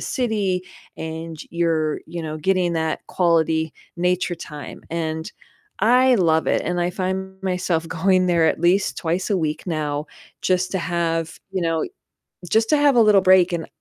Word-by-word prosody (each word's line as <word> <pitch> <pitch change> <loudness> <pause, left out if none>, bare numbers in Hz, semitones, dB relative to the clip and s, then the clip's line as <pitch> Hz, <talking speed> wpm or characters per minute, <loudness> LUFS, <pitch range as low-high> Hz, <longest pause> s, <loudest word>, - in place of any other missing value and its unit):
city 205 -7 -1 0.3
and 160 0 -6
you're, 165 -2 0
you 170 +1 -6
know, 155 -1 -4
getting 175 +1 +1
that 160 -1 -1
quality 160 -3 +1 0.2
nature 180 0 0
time, 150 -3 -9
and 160 +1 -3 0.5
I 250 +3 +5
love 160 -5 +2
it, - - +2
and 175 0 -1
I 175 +1 +1
find 190 +1 -4
myself 180 -3 -1
going 185 +2 +2
there 170 -2 +3
at - - +1
least 185 +3 +2
twice 175 +4 -2
a 200 - +3
week 155 -2 -2
now 150 -3 -2 0.4
just 185 0 +1
to 190 - 0
have, 165 -2 -2
you 190 -2 -2
know 165 -1 0 0.7
just 220 0 +2
to 305 - +4
have 285 -2 +4
a 235 - +7
little 210 -3 +6
break, 185 -1 +5
and 165 -1 -3
175 Hz, 165 wpm, -22 LUFS, 160-190 Hz, 0.7 s, a